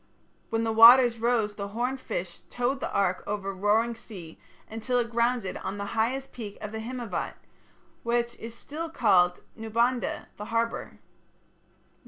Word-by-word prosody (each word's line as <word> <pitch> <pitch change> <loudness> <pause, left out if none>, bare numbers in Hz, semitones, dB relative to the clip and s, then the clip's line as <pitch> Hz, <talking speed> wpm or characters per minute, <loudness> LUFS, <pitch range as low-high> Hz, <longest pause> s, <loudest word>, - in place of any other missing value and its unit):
When 225 0 0
the 225 - 0
waters 235 +1 +8
rose 230 -3 +1
the 200 -1 -5
horned 245 +5 -2
fish 175 -6 -5
towed 245 +3 -1
the - - -4
ark 185 -2 +1
over 200 -1 -3
the - - -3
roaring 215 +4 +2
sea, 185 -8 -11 0.3
until 225 +3 -2
it 235 -1 0
grounded 235 -4 0
on 195 +2 -5
the 200 - -4
highest 250 +5 -1
peak 215 -5 -8
of 210 - -6
the 220 - -5
Himavat, 240 0 -4 0.7
which 235 0 0
is 230 0 -8
still 320 +6 -6
called 190 - +3
Naubandha 235 +2 -1
(the 210 - -6
harbour). 230 +1 -2
230 Hz, 155 wpm, -27 LUFS, 205-240 Hz, 0.7 s, waters